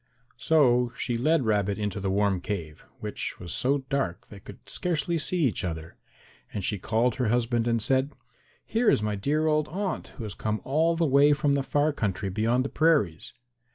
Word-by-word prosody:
So 125 -6 +3
she 120 - -1
led 145 +3 +2
Rabbit 100 -2 +1
into 105 -2 -3
the 95 0 -2
warm 100 -1 +1
cave, 85 -8 -5 0.2
which - - -5
was 90 -2 -5
so 135 +2 +1
dark 135 -12 -1
that - - -30
they 100 - -10
could - - -14
scarcely 170 -1 -1
see 175 +3 0
each 125 -7 0
other, 80 -2 -5 0.6
and 100 - -4
she 105 - -1
called 115 +5 0
her 125 -3 0
husband 120 0 +1
and 115 -1 +2
said, 130 +5 +1 0.5
"Here 230 0 +2
is 105 - +2
my 105 0 -1
dear 145 +10 0
old 155 -1 +2
aunt 195 +2 -3
who 115 - -6
has 105 -3 -5
come 110 +2 -2
all 160 +5 +2
the 165 0 +1
way 145 +1 +5
from 145 -1 +1
the 140 - +1
far 145 +2 +1
country 100 -5 -2
beyond 115 +6 +1
the - - -2
prairies." 145 - +1
120 Hz, 195 wpm, -27 LUFS, 105-150 Hz, 0.6 s, way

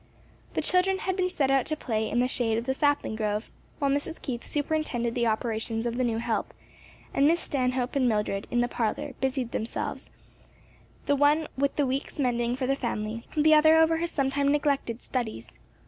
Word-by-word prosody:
The - - 0
children 370 +1 +3
had 375 -1 -2
been 365 -1 +1
sent 280 -6 +1
out 270 -2 +2
to 310 - -1
play 220 -7 -2
in 240 - +1
the 250 - +2
shade 230 -3 0
of 230 - -3
the 265 - 0
sapling 285 -4 +1
grove, 215 0 -2 0.3
while 280 -2 +1
Mrs. 290 +4 -2
Keith 245 -4 -4
superintended 290 -6 -1
the 235 -1 +1
operations 225 0 -1
of 235 0 -1
the 255 - 0
new 230 -2 0
help, 230 - -2 0.6
and 280 - +4
Miss 335 +2 +3
Stanhope 255 -3 -1
and 260 -3 +3
Mildred, 210 -2 -1
in 240 - +1
the 240 - +1
parlor, 230 -3 -2
busied 260 -3 -1
themselves, 225 - -4 1.0
the 285 - +3
one 295 +2 +3
with 280 +1 0
the 290 - +2
week's 265 +1 -3
mending 240 -3 0
for 260 0 -2
the 270 +1 +1
family, 230 -3 -4
the 310 +1 +5
other 315 +1 +6
over 320 0 +4
her 340 +1 -1
sometime 280 -2 0
neglected 280 -5 0
studies. 220 - -4
260 Hz, 195 wpm, -27 LUFS, 235-290 Hz, 1.0 s, other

